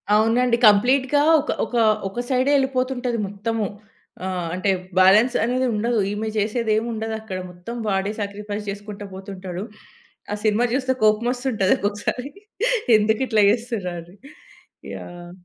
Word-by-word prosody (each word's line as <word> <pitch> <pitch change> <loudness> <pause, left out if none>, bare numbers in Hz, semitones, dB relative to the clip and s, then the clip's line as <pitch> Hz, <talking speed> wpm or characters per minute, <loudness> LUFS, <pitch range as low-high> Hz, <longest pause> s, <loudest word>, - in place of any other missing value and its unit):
అవునండి. 235 +3 +3
కంప్లీట్‌గా 260 +7 +4 0.2
ఒక, 300 - -5 0.2
ఒక, - - -14 0.4
ఒక 220 - -6
సైడే 260 +2 +2
ఎళ్ళిపోతుంటది 255 -2 -1
మొత్తము. 210 +2 -2 0.6
ఆహ్, 180 -2 -3
అంటే 185 +2 -1 0.3
బాలన్స్ 210 +7 +5
అనేదుండదు. 240 -2 0
ఈమె 215 +1 -3
చేసేదేముండదక్కడ 220 -1 -1
మొత్తం 180 +7 -8
వాడే 195 +1 0
సాక్రిఫైస్ 205 +1 -5
చేసుకుంట 205 +1 -7
పోతుంటాడు. 190 -1 -7 0.7
ఆ - - 0
సినిమా 215 +3 +3
చూస్తే 260 -1 +1
కొపమోస్తుంటది 235 -1 +2
ఒక్కొక్కసారి 205 +6 -2 0.7
ఎందుకిట్లా 220 +1 +2
చేస్తుర్రా 225 -6 -3
అని. 175 +3 -16 0.8
యాహ్! 175 0 -10
220 Hz, 110 wpm, -22 LUFS, 200-245 Hz, 0.8 s, బాలన్స్